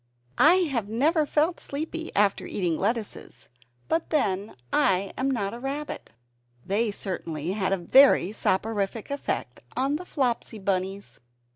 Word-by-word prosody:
I 325 Hz, +4 st, +7 dB, 0.2 s
have 230 Hz, -6 st, -1 dB
never 300 Hz, +7 st, +2 dB
felt 315 Hz, +5 st, +1 dB
sleepy 320 Hz, +3 st, -5 dB
after 200 Hz, -1 st, +2 dB
eating 175 Hz, -5 st, -1 dB
lettuces; 215 Hz, +4 st, -3 dB, 0.4 s
but 325 Hz, +1 st, 0 dB
then 205 Hz, -, 0 dB, 0.2 s
I 190 Hz, 0 st, +2 dB
am 265 Hz, +1 st, 0 dB
not 210 Hz, -6 st, -1 dB
a 235 Hz, -, -7 dB
rabbit. 280 Hz, +3 st, -5 dB, 0.6 s
They 215 Hz, +4 st, +1 dB
certainly 170 Hz, -5 st, -4 dB
had 195 Hz, -1 st, -1 dB
a 195 Hz, -, +2 dB
very 200 Hz, 0 st, +5 dB
soporific 210 Hz, +2 st, -1 dB
effect 280 Hz, -, -3 dB
upon 270 Hz, +4 st, 0 dB
the 360 Hz, -, -9 dB
Flopsy 245 Hz, -5 st, -1 dB
Bunnies! 195 Hz, 0 st, -3 dB
220 Hz, 135 wpm, -26 LUFS, 195-280 Hz, 0.6 s, I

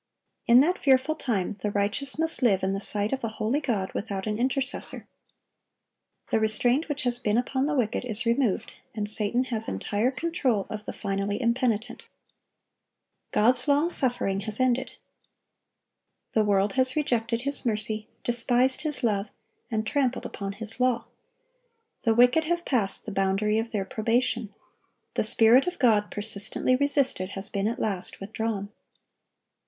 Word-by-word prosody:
In 240 Hz, +2 st, +7 dB
that 355 Hz, +6 st, 0 dB
fearful 270 Hz, +2 st, +2 dB
time 230 Hz, -, -2 dB
the 210 Hz, -, -1 dB
righteous 205 Hz, +8 st, -1 dB
must 325 Hz, -1 st, 0 dB
live 200 Hz, -7 st, +2 dB
in 190 Hz, +1 st, 0 dB
the 195 Hz, -, -3 dB
sight 205 Hz, +3 st, -1 dB
of 265 Hz, -, -4 dB
a -, -, -1 dB
holy 220 Hz, +6 st, -2 dB
God 215 Hz, -9 st, -3 dB
without 200 Hz, -3 st, -4 dB
an 215 Hz, 0 st, -3 dB
intercessor. 260 Hz, +1 st, -2 dB, 1.2 s
The -, -, +2 dB
restraint 245 Hz, +8 st, +2 dB
which 290 Hz, -1 st, -3 dB
has 245 Hz, -1 st, +3 dB
been 215 Hz, -2 st, 0 dB
upon 260 Hz, +3 st, -1 dB
the 300 Hz, -, -1 dB
wicked 240 Hz, -4 st, -1 dB
is 235 Hz, -1 st, +2 dB
removed, 230 Hz, -3 st, 0 dB, 0.2 s
and 210 Hz, -2 st, -3 dB
Satan 215 Hz, +4 st, +1 dB
has 225 Hz, 0 st, -2 dB
entire 215 Hz, +4 st, -1 dB
control 265 Hz, -, -1 dB
of 210 Hz, -1 st, -6 dB
the -, -, -5 dB
finally 200 Hz, +1 st, -3 dB
impenitent. 235 Hz, -2 st, -1 dB, 1.3 s
God's 245 Hz, +4 st, +3 dB
long 295 Hz, +4 st, +2 dB
suffering 245 Hz, -, 0 dB
has 210 Hz, +2 st, -3 dB
ended. 255 Hz, 0 st, 0 dB, 1.4 s
The 220 Hz, -, +2 dB
world 200 Hz, -1 st, +1 dB
has 260 Hz, 0 st, +1 dB
rejected 235 Hz, -5 st, -1 dB
His 280 Hz, +2 st, +6 dB
mercy, 215 Hz, -2 st, -2 dB, 0.2 s
despised 245 Hz, +2 st, +3 dB
His 300 Hz, -4 st, -3 dB
love, 205 Hz, -3 st, 0 dB, 0.4 s
and 220 Hz, -1 st, -2 dB
trampled 260 Hz, +1 st, -1 dB
upon 200 Hz, -1 st, -6 dB
His 225 Hz, +3 st, -2 dB
law. 250 Hz, -2 st, +1 dB, 1.0 s
The 225 Hz, -1 st, +3 dB
wicked 245 Hz, +7 st, +4 dB
have 345 Hz, +1 st, -2 dB
passed 215 Hz, -8 st, 0 dB
the 215 Hz, -, -6 dB
boundary 195 Hz, +2 st, 0 dB
of 225 Hz, +1 st, -4 dB
their 205 Hz, -4 st, -3 dB
probation; 230 Hz, +1 st, -1 dB, 0.6 s
the -, -, 0 dB
Spirit 235 Hz, +6 st, +6 dB
of 360 Hz, 0 st, -3 dB
God, 215 Hz, -4 st, +2 dB
persistently 210 Hz, +4 st, +3 dB
resisted, 275 Hz, -8 st, +1 dB
has 195 Hz, +1 st, -2 dB
been 200 Hz, 0 st, -2 dB
at 235 Hz, -, -3 dB
last 195 Hz, -4 st, -2 dB
withdrawn. 205 Hz, 0 st, -4 dB
230 Hz, 155 wpm, -26 LUFS, 210-260 Hz, 1.4 s, In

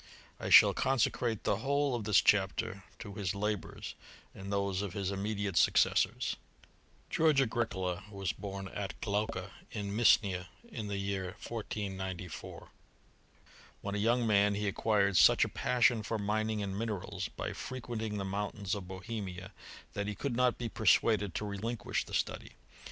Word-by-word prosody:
I -, -, -4 dB
shall -, -, +9 dB
consecrate 120 Hz, -3 st, +1 dB
the 100 Hz, -, +1 dB
whole 140 Hz, +3 st, +1 dB
of 115 Hz, -4 st, -2 dB
this 100 Hz, -5 st, +5 dB
chapter 95 Hz, -1 st, +1 dB
to 105 Hz, -3 st, -8 dB
his 100 Hz, -1 st, -2 dB
la 105 Hz, +1 st, +1 dB
bours, 95 Hz, -, -8 dB, 0.4 s
and 95 Hz, +1 st, -7 dB
those 100 Hz, -1 st, 0 dB
of 100 Hz, -4 st, -4 dB
his 100 Hz, -1 st, -2 dB
immediate 100 Hz, -2 st, -2 dB
successors. -, -, +3 dB, 0.7 s
George 155 Hz, -3 st, +4 dB
Agricola 105 Hz, -7 st, -1 dB
was 100 Hz, -3 st, -2 dB
bom 100 Hz, -1 st, -6 dB
at 100 Hz, -1 st, -5 dB
Glaucha, 105 Hz, -3 st, -2 dB, 0.2 s
in 100 Hz, -2 st, -4 dB
Misnia, 100 Hz, -5 st, +4 dB, 0.2 s
in 110 Hz, -3 st, -6 dB
the 100 Hz, -1 st, -2 dB
year 100 Hz, -1 st, -3 dB
1494. 95 Hz, -5 st, -5 dB, 1.1 s
When 100 Hz, -, -4 dB
a 105 Hz, -, -1 dB
young 120 Hz, +3 st, +2 dB
man 105 Hz, -1 st, +4 dB
he 105 Hz, 0 st, -1 dB
acquired 100 Hz, -1 st, +2 dB
such 80 Hz, -, +7 dB
a -, -, -5 dB
passion 120 Hz, -2 st, +2 dB
for 110 Hz, +1 st, -2 dB
mining 110 Hz, +1 st, -1 dB
and 95 Hz, -1 st, -3 dB
minerals, 100 Hz, -3 st, -3 dB
by -, -, -5 dB
frequenting 115 Hz, -4 st, -4 dB
the 100 Hz, -, -2 dB
mountains 100 Hz, 0 st, -3 dB
of 100 Hz, -4 st, -4 dB
Bohemia, 95 Hz, -1 st, -6 dB, 0.4 s
that 100 Hz, 0 st, -2 dB
he 105 Hz, -, -3 dB
could 135 Hz, +3 st, -2 dB
not 125 Hz, 0 st, +3 dB
be 120 Hz, -, -3 dB
persuaded 105 Hz, -2 st, +3 dB
to 105 Hz, -, -2 dB
relinquish 105 Hz, +2 st, -2 dB
the -, -, -5 dB
study. -, -, -2 dB
100 Hz, 155 wpm, -32 LUFS, 95-110 Hz, 1.1 s, shall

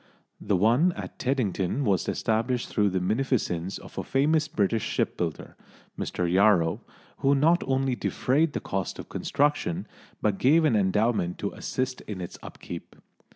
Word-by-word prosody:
The 105 Hz, -1 st, 0 dB
one 120 Hz, -, +3 dB
at -, -, -8 dB
Teddington 125 Hz, -2 st, 0 dB
was 95 Hz, -5 st, +1 dB
established 120 Hz, +3 st, 0 dB
through 105 Hz, -2 st, +2 dB
the 95 Hz, 0 st, 0 dB
munificence 100 Hz, -4 st, -1 dB
of -, -, -9 dB
a -, -, -2 dB
famous 155 Hz, +3 st, +2 dB
British 110 Hz, -2 st, 0 dB
shipbuilder, 85 Hz, -4 st, -2 dB, 0.4 s
Mr 90 Hz, -, -2 dB
Yarrow, 90 Hz, -2 st, +3 dB, 0.4 s
who 140 Hz, +1 st, +3 dB
not 165 Hz, +5 st, +3 dB
only 135 Hz, -1 st, +1 dB
defrayed 140 Hz, +7 st, +1 dB
the -, -, -3 dB
cost 95 Hz, -2 st, -3 dB
of -, -, -9 dB
construction, 145 Hz, -, 0 dB, 0.3 s
but 105 Hz, -2 st, 0 dB
gave 155 Hz, +5 st, +4 dB
an 125 Hz, -, +3 dB
endowment 105 Hz, -2 st, +1 dB
to -, -, -3 dB
assist 130 Hz, 0 st, -3 dB
in 105 Hz, -3 st, -5 dB
its 90 Hz, -, -7 dB
upkeep. -, -, -9 dB
110 Hz, 150 wpm, -27 LUFS, 95-135 Hz, 0.4 s, gave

